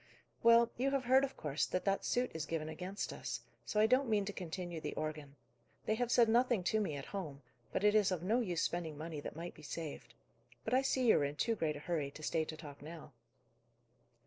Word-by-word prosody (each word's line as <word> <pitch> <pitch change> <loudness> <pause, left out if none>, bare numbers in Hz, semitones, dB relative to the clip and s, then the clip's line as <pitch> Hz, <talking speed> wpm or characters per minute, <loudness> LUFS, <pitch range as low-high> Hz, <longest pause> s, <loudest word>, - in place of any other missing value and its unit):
"Well, 230 0 +6
you 260 +3 +2
have 275 -1 0
heard, 260 +2 +6
of 275 - -3
course, 145 -1 -1
that 185 - -2
that 195 0 +1
suit 250 +1 +1
is 160 -1 -4
given 155 -1 -2
against 185 +5 -4
us, - - -4 0.3
so 210 - +1
I 215 - +6
don't 255 +3 +3
mean 210 -2 +2
to 205 - -4
continue 175 -2 -5
the - - -4
organ. 150 -2 -4 0.5
They - - +2
have 240 +2 0
said 235 -2 +6
nothing 240 -3 +3
to 220 - +4
me 175 -8 -1
at 140 0 -6
home; 150 -8 -5 0.3
but - - -1
it 210 0 +5
is 210 -2 +4
of 175 -2 -2
no 220 +6 +2
use 180 -8 0
spending 165 -3 -2
money 155 0 -5
that 145 - -6
might 170 +2 -6
be - - -14
saved. 155 0 -6 0.5
But - - -1
I 260 - +5
see 265 -1 +1
you - - +6
are - - +1
in 140 +1 -1
too 230 +9 +1
great 160 -8 -1
a - - -6
hurry, 155 -4 -1
to 155 +2 -11
stay 160 +1 +1
to 155 0 -7
talk 145 -3 -10
now." 155 -1 -9
180 Hz, 235 wpm, -35 LUFS, 155-225 Hz, 0.5 s, Well